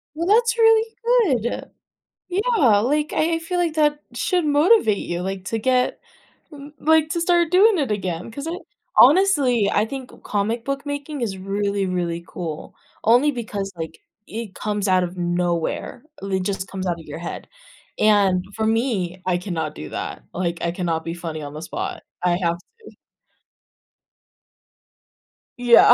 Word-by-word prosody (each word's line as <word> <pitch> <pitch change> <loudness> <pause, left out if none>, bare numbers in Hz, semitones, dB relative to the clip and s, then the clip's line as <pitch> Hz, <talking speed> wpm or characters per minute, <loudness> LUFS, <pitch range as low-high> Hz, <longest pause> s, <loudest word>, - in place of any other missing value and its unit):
Well, 335 +2 -2
that's 465 +3 +4
really 450 0 +4 0.5
good. 240 - -3 0.6
Yeah, 375 - +3
like, 295 +7 0
I 330 +2 +2
I - - 0
feel 355 +2 -3
like 340 -3 +1
that 295 -1 +2
should 355 +8 0
motivate 295 - +4
you, 175 0 -3
like, 190 0 -4
to 225 - -1
get, 250 +2 +1 0.5
m 290 0 -11
like, 315 0 +3
to 340 - -1
start 345 -1 +3
doing 390 +2 +5
it 270 -7 0
again, 185 -1 -3
'cause 280 +6 -7
I 335 +2 -3 0.4
honestly, 275 - +5
I 205 - +2
think 260 +2 -8
comic 220 +3 -1
book 275 +2 -3
making 285 -1 -4
is 195 -5 -2
really, 200 +1 -1
really 170 -2 -2
cool 160 -4 -6 0.3
only 245 +6 +5
because, 205 -5 -4
like, 160 -1 -6 0.3
it 215 -3 -6
comes 210 -1 -2
out 185 -1 +3
of 180 +1 -4
nowhere, 175 - -2 0.2
it 190 -1 -1
just 195 -1 -3
comes 190 -1 -5
out 170 -2 -1
of 160 - -13
your 150 +2 -7
head, 170 - -7 0.5
and, 200 -4 +4
for 220 - -1
me, 220 -6 0
I 180 -1 +2
cannot 165 -5 -3
do 75 - -7
that, - - -5
like, 170 -1 -2
I 170 - 0
cannot 170 -2 -2
be 165 - -4
funny 165 -3 -6
on 145 - -7
the 155 - -7
spot. 365 - -5 0.2
I 175 -1 +2
have 170 0 +1
to 455 - -18 2.7
Yeah, 240 -1 +7
215 Hz, 160 wpm, -22 LUFS, 180-300 Hz, 2.7 s, Yeah